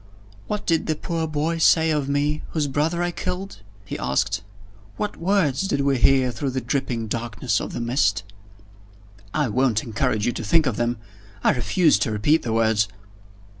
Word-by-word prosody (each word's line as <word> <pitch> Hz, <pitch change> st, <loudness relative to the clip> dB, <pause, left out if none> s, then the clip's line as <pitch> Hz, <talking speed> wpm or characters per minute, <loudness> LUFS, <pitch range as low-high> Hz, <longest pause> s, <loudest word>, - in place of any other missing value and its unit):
"What 210 Hz, -1 st, -3 dB
did 165 Hz, -2 st, +1 dB
the 155 Hz, -, +1 dB
poor 165 Hz, 0 st, -3 dB
boy 155 Hz, +2 st, -1 dB
say 160 Hz, 0 st, +4 dB
of 145 Hz, -3 st, -1 dB
me, 145 Hz, +2 st, 0 dB
whose 155 Hz, -3 st, +1 dB
brother 155 Hz, +5 st, 0 dB
I 175 Hz, -, 0 dB
killed?" 185 Hz, -, -5 dB, 0.2 s
he -, -, -5 dB
asked. 65 Hz, -, 0 dB, 0.6 s
"What 210 Hz, -1 st, -3 dB
words 180 Hz, -3 st, +1 dB
did 140 Hz, -6 st, 0 dB
we 140 Hz, -2 st, +1 dB
hear 130 Hz, 0 st, +4 dB
through 140 Hz, +3 st, -3 dB
the 130 Hz, 0 st, -2 dB
dripping 125 Hz, -3 st, -2 dB
darkness 115 Hz, 0 st, -1 dB
of -, -, -5 dB
the -, -, -4 dB
mist?" 120 Hz, -4 st, +1 dB, 1.1 s
"I 150 Hz, +2 st, +1 dB
won't 120 Hz, -1 st, +1 dB
encourage 110 Hz, -1 st, -1 dB
you 120 Hz, -, +2 dB
to 115 Hz, -, -5 dB
think 160 Hz, +9 st, +3 dB
of 125 Hz, -6 st, -1 dB
them. 120 Hz, 0 st, 0 dB, 0.5 s
I -, -, +5 dB
refuse 155 Hz, +6 st, +2 dB
to 115 Hz, -, 0 dB
repeat 145 Hz, +10 st, +2 dB
the 115 Hz, -, -3 dB
words." 110 Hz, -2 st, +2 dB
140 Hz, 175 wpm, -23 LUFS, 120-160 Hz, 1.1 s, I